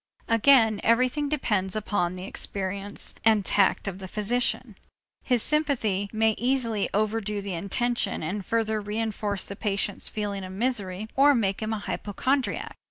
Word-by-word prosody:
Again 230 -2 +5
everything 255 +5 +2
depends 210 -10 0
upon 205 -4 -1
the 185 0 -7
experience 200 +1 -2
and 215 -3 +4
tact 200 0 +2
of 195 -1 -4
the 190 - -7
physician. 230 +2 0 0.5
His 245 -3 +1
sympathy 235 -10 0
may 220 0 +3
easily 235 -4 0
overdo 210 0 -1
the 200 -1 -5
intention 200 +4 -1
and 195 +6 -3
further 220 0 0
reënforce 210 -1 -2
the 200 - -4
patient's 205 -1 -1
feeling 205 -2 -3
of 185 0 -7
misery 205 -3 -1
or 280 +1 +6
make 200 -4 0
him 215 0 -2
an 220 -2 -2
hypochondriac. 255 +7 -2
215 Hz, 145 wpm, -26 LUFS, 200-235 Hz, 0.5 s, or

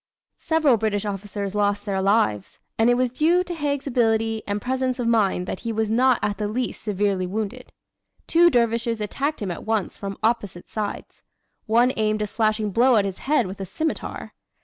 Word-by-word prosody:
Several 315 -7 +3
British 210 -1 -1
officers 200 0 -4
lost 205 -1 0
their 195 -2 -1
lives, 190 - +1 0.2
and 225 +2 +5
it 245 - +4
was 250 -1 +1
due 330 +7 +3
to 355 - -5
Haig's 290 -4 -2
agility 225 -4 +1
and 205 0 -1
presence 255 +1 -1
of 245 -2 -2
mind 205 -6 +2
that 185 - -4
he 230 - -4
was 220 -1 -1
not 250 +2 +4
at 205 -2 -1
the 210 - -1
least 240 +3 -3
severely 200 -3 0
wounded. 220 +6 -5 0.5
Two 345 +1 +5
dervishes 235 -3 +1
attacked 275 +6 -2
him 190 - -2
at 170 - -6
once 220 -3 -1
from 195 -1 -6
opposite 210 -6 -1
sides. 215 -2 -5 0.5
One 240 +4 +4
aimed 215 -1 +1
a - - 0
slashing 215 0 0
blow 245 +5 +4
at 205 -2 +3
his 195 -2 -4
head 275 -4 +1
with 190 +1 -7
a - - -3
scimitar. 315 - -4
220 Hz, 190 wpm, -23 LUFS, 205-250 Hz, 0.5 s, and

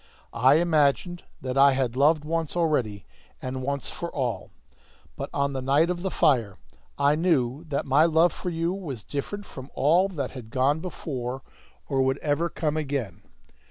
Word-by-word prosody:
I 130 +6 +5
imagined 165 +1 +2 0.2
that 130 +1 -1
I 140 0 +7
had 130 -2 -1
loved 150 +3 +3
once 165 0 -2
already 125 - 0 0.3
and 130 0 -4
once 140 +1 -2
for 170 - -5
all. 120 - -3 0.7
But - - -5
on 140 0 0
the 130 - -3
night 145 +6 +3
of 175 -1 -4
the 190 - -1
fire 120 - +2 0.4
I 140 +1 +4
knew 150 -3 +1
that 145 -3 -2
my 140 +4 +4
love 165 +1 +4
for 180 - -4
you 165 +1 -1
was 145 - -6
different 200 +8 -5
from 130 -5 -10
all 170 +7 +4
that 145 -9 -4
had 125 -4 -9
gone 135 +5 +1
before 135 -7 -5 0.4
or 135 -2 +1
would 130 +1 +1
ever 155 +4 0
come 155 -2 -2
again. 135 - -3
140 Hz, 170 wpm, -26 LUFS, 130-165 Hz, 0.7 s, I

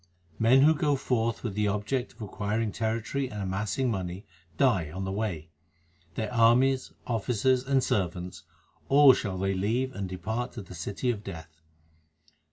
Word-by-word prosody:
Men 125 +4 +5
who 155 +2 +6
go 150 -2 +1
forth 115 -4 -1
with 115 -5 -3
the 105 +1 0
object 105 +6 -2
of - - -9
acquiring 105 +2 -2
territory 115 +5 -2
and 105 - -7
amassing 105 +6 -1
money, 95 -1 -4 0.3
die 110 - +2
on 95 +5 -5
the 95 - -3
way. 90 -7 -3 0.6
Their 110 +3 -3
armies, 125 +3 +4
officers, 125 +2 +1
and 135 -1 +2
servants 90 -2 -2 0.5
all 140 -1 +8
shall 100 -7 -3
they 95 +1 0
leave 115 +8 -1
and 100 -4 -4
depart 110 +7 -4
to 110 - -7
the 90 - -12
city 100 +8 -2
of 105 -3 -6
Death. 80 -4 -9
110 Hz, 160 wpm, -28 LUFS, 95-125 Hz, 0.6 s, all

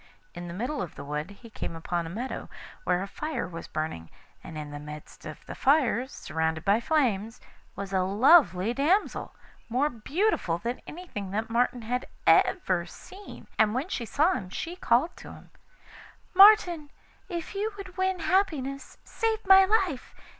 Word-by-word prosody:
In 175 0 -7
the 170 - -6
middle 250 +9 -2
of 180 - -6
the - - -8
wood 150 +4 -4
he 220 +3 -14
came 165 - -5
upon 170 +1 -3
a - - -6
meadow, 235 +9 -5 0.4
where 180 +1 +1
a - - -5
fire 305 +5 -4
was 165 -1 -8
burning, 155 - -4 0.3
and 160 - -8
in 150 -1 -6
the 145 - -6
midst 150 +1 -10
of - - -10
the - - -7
fire, 265 -3 +2
surrounded 160 - -3
by 205 +2 +4
flames, 230 -8 0 0.4
was 195 0 -6
a 190 - +3
lovely 205 - +4
damsel, 325 +11 0 0.3
more 270 +6 +1
beautiful 255 - 0
than 235 +7 -4
anything 300 - -7
that 220 +4 -3
Martin 245 0 +1
had 250 +3 -2 0.2
ever 185 - +3
seen, 390 - -12
and 215 +1 +4
when 275 +8 -2
she 240 - -3
saw 320 +10 +3
him 190 - -5
she 335 - -5
called 295 0 +1
to - - -10
him: - - -15 0.8
'Martin, 365 -6 +6 0.4
if 340 -3 -5
you 415 +2 -2
would 375 -2 -9
win 375 -1 0
happiness, 285 -9 -1
save 445 -2 -2
my 385 0 +8
life. 380 - 0
245 Hz, 170 wpm, -27 LUFS, -, 0.8 s, my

